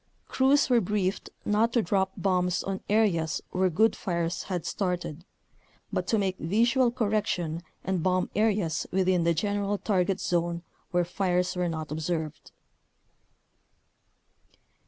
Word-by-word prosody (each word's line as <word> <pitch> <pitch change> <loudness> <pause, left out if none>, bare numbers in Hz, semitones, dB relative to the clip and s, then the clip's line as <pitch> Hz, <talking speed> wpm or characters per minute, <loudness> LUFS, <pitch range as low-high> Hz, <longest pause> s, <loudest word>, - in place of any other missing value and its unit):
Crews 270 +2 +3
were 245 -2 +4
briefed 195 -1 -1 0.2
not 215 +3 +2
to 235 - +3
drop 190 +1 +1
bombs 180 -1 +1
on 195 -1 -3
areas 185 -7 +2
where 185 0 +2
good 215 +6 +3
fires 170 -1 -2
had 180 -4 -3
started, 175 -4 -3 0.7
but - - -1
to 225 - +2
make 190 -2 -1
vis 220 +8 +2
ual 260 -2 +4
correction 200 -8 0 0.2
and 185 -2 -1
bomb 185 +1 +1
areas 205 -6 +1
within 185 -2 +2
the 170 0 +3
gen 205 +5 0
eral 205 0 -1
target 190 -2 +1
zone 170 -1 -1 0.3
where 175 -1 +1
fires 180 0 0
were 180 -1 0
not 160 -2 -5
observed. 160 0 -3
185 Hz, 135 wpm, -28 LUFS, 175-205 Hz, 0.7 s, were